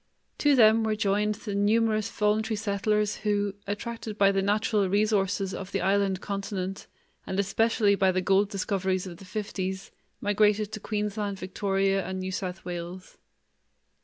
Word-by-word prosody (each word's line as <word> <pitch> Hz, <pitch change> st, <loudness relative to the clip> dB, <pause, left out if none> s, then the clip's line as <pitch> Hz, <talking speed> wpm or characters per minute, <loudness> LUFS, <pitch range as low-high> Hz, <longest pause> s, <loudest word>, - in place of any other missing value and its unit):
To 290 Hz, -1 st, +4 dB
them 225 Hz, -2 st, +6 dB
were 220 Hz, -1 st, 0 dB
joined 210 Hz, 0 st, +1 dB
the 210 Hz, -1 st, -6 dB
numerous 215 Hz, +1 st, +2 dB
voluntary 215 Hz, +1 st, 0 dB
settlers 210 Hz, 0 st, 0 dB
who, 205 Hz, -1 st, 0 dB
attracted 215 Hz, +1 st, -5 dB
by 200 Hz, -1 st, +5 dB
the 195 Hz, 0 st, +1 dB
natural 205 Hz, 0 st, +1 dB
resources 200 Hz, -1 st, +1 dB
of 190 Hz, 0 st, -6 dB
the 195 Hz, -, -1 dB
island 195 Hz, -1 st, +1 dB
continent 195 Hz, -1 st, -4 dB, 0.4 s
and 190 Hz, -, -2 dB
especially 210 Hz, +1 st, +2 dB
by 190 Hz, -1 st, +3 dB
the 185 Hz, -, 0 dB
gold 195 Hz, +2 st, +2 dB
discoveries 190 Hz, -2 st, -1 dB
of 175 Hz, -2 st, -8 dB
the 195 Hz, -, -13 dB
fifties, 190 Hz, -2 st, -4 dB, 0.3 s
migrated 210 Hz, 0 st, +2 dB
to 215 Hz, -, -5 dB
Queensland, 210 Hz, -1 st, -2 dB
Victoria, 195 Hz, +1 st, 0 dB
and 190 Hz, +1 st, -4 dB
New 185 Hz, 0 st, -3 dB
South 185 Hz, -1 st, -5 dB
Wales. 175 Hz, +1 st, -7 dB
200 Hz, 150 wpm, -27 LUFS, 195-210 Hz, 0.4 s, them